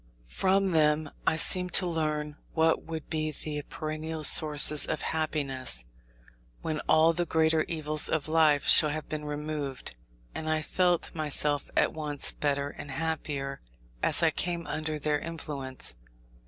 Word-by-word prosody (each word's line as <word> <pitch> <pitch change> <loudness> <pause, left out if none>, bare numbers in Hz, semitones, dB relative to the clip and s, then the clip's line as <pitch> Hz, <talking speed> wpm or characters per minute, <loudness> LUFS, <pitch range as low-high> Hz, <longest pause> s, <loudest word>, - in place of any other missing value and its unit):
From 190 - +1
them 150 -1 +1 0.2
I - - +3
seemed 180 +2 +4
to 185 - +5
learn 155 -3 -2 0.2
what 160 0 +2
would 160 -1 -7
be 155 -1 -2
the 150 0 -5
perennial 155 0 -5
sources 150 0 +6
of 155 - -3
happiness, 135 - -3 0.8
when 155 -1 -3
all 160 +1 +5
the 175 +1 -2
greater 160 0 +2
evils 155 -2 0
of 155 -2 -1
life 155 -3 +3
shall 155 - +7
have 155 +1 -5
been 150 -1 -5
removed. 150 - -5 0.4
And 155 0 -5
I 155 0 0
felt 175 +1 0
myself 150 -2 +1
at - - +2
once 150 -2 -1
better 145 -1 -2
and 145 - -10
happier 140 -2 -4 0.4
as - - +3
I - - +4
came 170 -1 -3
under 155 0 -4
their 150 0 -1
influence. 145 - -5
155 Hz, 145 wpm, -28 LUFS, 150-160 Hz, 0.8 s, shall